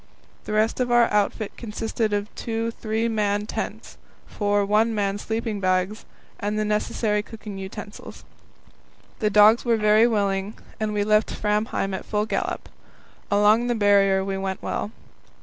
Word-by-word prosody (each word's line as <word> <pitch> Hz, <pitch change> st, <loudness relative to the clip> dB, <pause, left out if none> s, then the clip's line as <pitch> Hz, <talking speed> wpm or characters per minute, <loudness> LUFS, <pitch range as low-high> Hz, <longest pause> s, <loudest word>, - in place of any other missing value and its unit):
The -, -, -4 dB
rest 215 Hz, +3 st, +1 dB
of 250 Hz, -1 st, 0 dB
our 240 Hz, 0 st, +6 dB
outfit 210 Hz, +1 st, 0 dB
consisted 225 Hz, 0 st, -2 dB
of 205 Hz, +1 st, -2 dB
two 230 Hz, 0 st, -3 dB
three 225 Hz, 0 st, -2 dB
man 210 Hz, -2 st, 0 dB
tents, -, -, -6 dB, 0.3 s
four 205 Hz, -1 st, 0 dB
one 220 Hz, +3 st, +2 dB
man 200 Hz, -1 st, -1 dB
sleeping 220 Hz, -1 st, -3 dB
bags, 185 Hz, +2 st, 0 dB, 0.3 s
and 210 Hz, +1 st, -2 dB
the 215 Hz, -, 0 dB
necessary 210 Hz, 0 st, 0 dB
cooking 210 Hz, -2 st, -9 dB
utensils. 205 Hz, +2 st, -9 dB, 1.0 s
The 215 Hz, -, +1 dB
dogs 210 Hz, +3 st, +6 dB
were 235 Hz, -2 st, +2 dB
very 215 Hz, +2 st, +5 dB
willing, 200 Hz, -2 st, -1 dB, 0.2 s
and 215 Hz, -1 st, -1 dB
we 205 Hz, -1 st, 0 dB
left 215 Hz, +1 st, +3 dB
Framheim 210 Hz, -2 st, -1 dB
at 190 Hz, -, -4 dB
full 210 Hz, 0 st, 0 dB
gallop. -, -, -3 dB, 0.6 s
Along 210 Hz, +4 st, +4 dB
the 240 Hz, -, +1 dB
Barrier 200 Hz, -2 st, +3 dB
we 195 Hz, 0 st, -2 dB
went 190 Hz, -1 st, -4 dB
well. -, -, -2 dB
210 Hz, 150 wpm, -24 LUFS, 205-220 Hz, 1.0 s, our